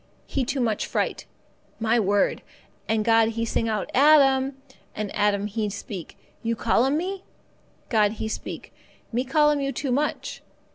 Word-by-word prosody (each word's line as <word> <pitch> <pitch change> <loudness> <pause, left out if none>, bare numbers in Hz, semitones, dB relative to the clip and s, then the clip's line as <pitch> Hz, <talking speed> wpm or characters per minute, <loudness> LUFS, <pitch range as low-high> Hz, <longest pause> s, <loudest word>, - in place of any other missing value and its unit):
He 270 -3 -1
too 270 +1 -1
much 220 -3 0
fright. - - -2 0.5
My 230 +1 +2
word! 205 -1 +1 0.5
And 220 -1 +1
God 225 -1 +4
He 230 - 0
sing 225 0 -1
out, 210 -4 -2
'Adam!' 270 -1 +5 0.4
And 210 -1 -4
Adam 205 -1 +2
he 210 0 -2
speak, 195 -3 -7 0.2
'You 230 0 -1
call 230 +2 +2
'm 275 +3 +1
me?' 380 +3 -3 0.7
God 215 -2 +3
He 220 - -4
speak, 220 - -6 0.4
'Me 245 +2 0
call 295 +3 +3
'm 290 -1 0
you 275 0 -1
too 275 -1 -3
much. 290 +4 -2
230 Hz, 160 wpm, -25 LUFS, 215-275 Hz, 0.7 s, Adam